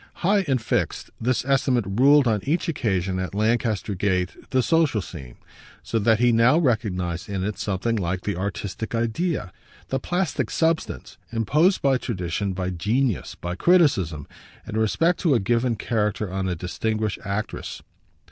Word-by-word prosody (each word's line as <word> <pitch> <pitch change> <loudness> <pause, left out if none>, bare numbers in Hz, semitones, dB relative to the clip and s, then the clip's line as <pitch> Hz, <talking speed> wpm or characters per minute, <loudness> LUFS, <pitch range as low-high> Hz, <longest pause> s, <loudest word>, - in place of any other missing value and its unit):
High 200 0 +3
and 135 -2 +2
fixed, 110 - -2
this 120 +1 0
estimate 130 -4 +2
ruled 135 +7 +5
on 110 -2 +2
each 160 - -1
occasion 95 - -1
at 95 +1 -4
Lancaster 110 -1 0
Gate 95 -1 0
the 130 -2 +2
social 160 -8 +2
scene; 70 -10 -9 0.5
so 115 - -1
that 110 +1 +3
he 120 +1 +4
now 115 +6 +5
recognised 100 - -1
in 95 -2 -2
it 105 +1 -3
something 105 +4 -1
like 90 -1 -2
the 100 - -2
artistic 100 +4 -4
idea, 115 - -1 0.4
the 135 - 0
plastic 180 +6 -1
substance, 160 - -1
imposed 150 - +2
by 135 -2 +3
tradition, 95 -2 -2
by 90 0 -2
genius, 110 +6 -1
by 90 0 -5
criticism, 95 - +2 0.4
in - - -6
respect 165 +11 +2
to 155 -7 +3
a - - +3
given 120 +4 +1
character, 105 -3 -1
on 95 -1 -1
a 90 - -1
distinguished 110 +4 -2
actress. 100 +1 -4
110 Hz, 155 wpm, -24 LUFS, 95-130 Hz, 0.5 s, ruled